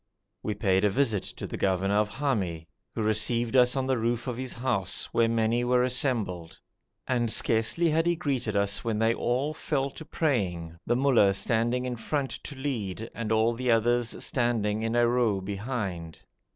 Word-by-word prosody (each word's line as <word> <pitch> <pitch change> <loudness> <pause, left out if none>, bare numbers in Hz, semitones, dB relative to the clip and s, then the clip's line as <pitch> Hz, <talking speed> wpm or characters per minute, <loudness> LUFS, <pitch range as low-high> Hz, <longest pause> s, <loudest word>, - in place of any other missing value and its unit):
We 105 - -3
paid 95 -2 +1
a 105 - +4
visit 110 -3 +1
to - - -7
the - - -6
governor 95 +1 +1
of 105 0 +2
Hami, 100 - -2 0.3
who 110 - -1
received 115 +3 0
us 125 0 +5
on 135 -1 0
the 130 -2 0
roof 120 +1 -1
of 125 -3 -3
his 130 +1 -5
house, 120 -7 0
where 115 -1 +2
many 115 +1 +1
were 125 0 +3
assembled, 115 - -1 0.5
and 120 -3 +1
scarcely 115 +12 +2
had 165 +2 +2
he 175 - +3
greeted 135 -10 -2
us 100 0 0
when 115 -2 -1
they 115 +1 +3
all 130 +6 -1
fell 140 -3 -2
to 160 - -10
praying, 95 - -1
the 120 - +2
mollah 120 -7 +4
standing 120 +4 0
in 125 -1 -3
front 135 +4 -2
to 145 - -7
lead, 115 -6 -4
and 115 -2 -4
all 110 +1 +3
the 125 +2 -3
others 120 +1 +1
standing 110 -3 0
in 115 +1 -1
a 120 0 +4
row 120 -5 +2
behind. 100 -4 -4
115 Hz, 180 wpm, -27 LUFS, 105-125 Hz, 0.5 s, us